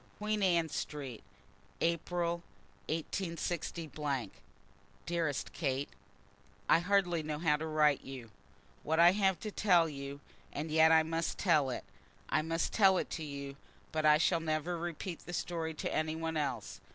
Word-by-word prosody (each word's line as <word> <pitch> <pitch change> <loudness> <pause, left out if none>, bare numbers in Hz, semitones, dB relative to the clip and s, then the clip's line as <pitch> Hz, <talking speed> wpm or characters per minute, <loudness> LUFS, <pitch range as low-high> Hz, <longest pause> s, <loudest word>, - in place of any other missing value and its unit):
Queen 210 0 -1
Anne 170 -4 +3
Street, 140 -5 -5 0.6
April, 170 +1 0 0.5
186. 165 +1 -2 1.3
DEAREST 165 -5 -1
KATE, 140 -2 -1 0.8
I - - +6
hardly 180 -2 +2
know 150 -1 -3
how 150 -1 +3
to 155 +2 -4
write 150 -2 +3
to - - -15
you 125 -4 -8 0.5
what 160 +2 0
I 170 +1 +8
have 190 -3 +2
to 215 - -4
tell, 180 -5 +4
and 145 +1 -7
yet 160 +1 +6
I 160 0 +6
must 165 +1 -2
tell 155 -8 +3
it. 125 - -4 0.5
I - - +2
must 165 +1 -1
tell 195 -3 +5
it - - -2
to 160 - -3
you, 140 -2 -6 0.3
but 155 0 -1
I 150 0 +7
shall 170 +1 +2
never 160 +2 -1
repeat 170 +1 -4
the 175 - -6
story 165 -2 -2
to - - -3
any 155 0 0
one 160 0 -3
else. 135 -8 -3
160 Hz, 150 wpm, -33 LUFS, 150-175 Hz, 1.3 s, I